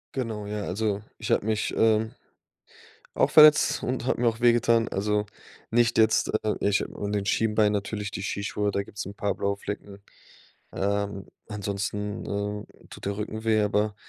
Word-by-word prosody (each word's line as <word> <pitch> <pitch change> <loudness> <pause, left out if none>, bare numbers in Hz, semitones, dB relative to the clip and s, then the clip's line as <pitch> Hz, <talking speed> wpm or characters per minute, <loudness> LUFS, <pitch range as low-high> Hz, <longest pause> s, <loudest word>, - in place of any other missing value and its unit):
Genau, 110 -5 -3
ja, 105 0 -4
also 100 +1 -1 0.2
ich - - -4
hab - - +3
mich, 110 0 -1
ähm, 110 0 +3 1.0
auch - - +2
verletzt 155 -1 +7
und 125 -1 -2
hab - - 0
mir 120 -1 +3
auch 115 +1 -3
wehgetan. 115 -1 +4
Also 105 +1 0 0.5
nicht 120 0 +3
jetzt 110 0 +4 0.2
äh, 105 - +1
nicht 100 0 +2
an 100 0 -4
den 100 -1 -1
Schienbein, 105 0 +2
natürlich 100 0 -3
die 95 - -5
Skischuhe, 100 +1 -2
da 100 0 -1
gibt's 100 +1 -7
'n 100 - -7
paar 100 -1 -1
blaue 100 0 -1
Flecken. 100 0 -7 0.7
Ähm, 100 0 -2 0.2
ansonsten, 105 0 -3
ähm, 105 +1 -3 0.2
tut - - -11
der 100 0 -2
Rücken 110 +1 -5
weh, 110 -1 +3
aber 105 0 +1
105 Hz, 165 wpm, -26 LUFS, 100-110 Hz, 1.0 s, verletzt